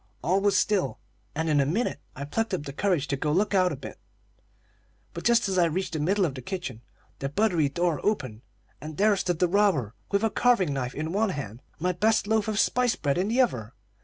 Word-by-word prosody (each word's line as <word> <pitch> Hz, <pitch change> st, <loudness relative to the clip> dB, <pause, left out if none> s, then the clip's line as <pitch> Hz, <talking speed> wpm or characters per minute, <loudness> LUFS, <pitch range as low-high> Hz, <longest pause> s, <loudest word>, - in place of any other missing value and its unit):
All 185 Hz, +5 st, +2 dB
was 200 Hz, -1 st, +3 dB
still, 205 Hz, -2 st, +1 dB, 0.4 s
and 160 Hz, +2 st, -1 dB
in 150 Hz, -2 st, +3 dB
a 140 Hz, -, +3 dB
minute 195 Hz, 0 st, -1 dB, 0.2 s
I 140 Hz, -, -5 dB
plucked 220 Hz, +6 st, -1 dB
up 170 Hz, -, -5 dB
courage 175 Hz, -7 st, +1 dB
to 140 Hz, -, +1 dB
go 150 Hz, +2 st, -1 dB
to 155 Hz, -, +2 dB
look 210 Hz, +1 st, +1 dB
out 185 Hz, -2 st, +3 dB
a -, -, -3 dB
bit; -, -, -10 dB, 1.1 s
but -, -, -6 dB
just 235 Hz, -2 st, +3 dB
as 190 Hz, -1 st, +1 dB
I 175 Hz, -, +5 dB
reached 175 Hz, +3 st, -2 dB
the 155 Hz, -, -2 dB
middle 190 Hz, +6 st, +2 dB
of 150 Hz, -, -2 dB
the 130 Hz, -, -7 dB
kitchen, 130 Hz, -, -5 dB, 0.4 s
the 135 Hz, -, -2 dB
buttery 170 Hz, -3 st, +1 dB
door 170 Hz, +1 st, -1 dB
opened, 130 Hz, -, -1 dB, 0.4 s
and 155 Hz, 0 st, -8 dB
there 210 Hz, +1 st, +4 dB
stood 180 Hz, -3 st, -1 dB
the 180 Hz, -, +3 dB
robber, 175 Hz, -, +2 dB, 0.2 s
with 200 Hz, +1 st, +1 dB
a 225 Hz, -, +2 dB
carving 200 Hz, -12 st, +2 dB
knife 130 Hz, -2 st, -3 dB
in 155 Hz, +3 st, -3 dB
one 215 Hz, +2 st, +2 dB
hand 130 Hz, -, -6 dB
and -, -, -29 dB
my 180 Hz, +1 st, +2 dB
best 215 Hz, +4 st, +2 dB
loaf 220 Hz, 0 st, +1 dB
of 215 Hz, -1 st, -1 dB
spice 250 Hz, -2 st, +2 dB
bread 145 Hz, +1 st, -1 dB
in 190 Hz, -, 0 dB
the 240 Hz, +4 st, +3 dB
other. 120 Hz, -, -1 dB
180 Hz, 230 wpm, -26 LUFS, 145-205 Hz, 1.1 s, I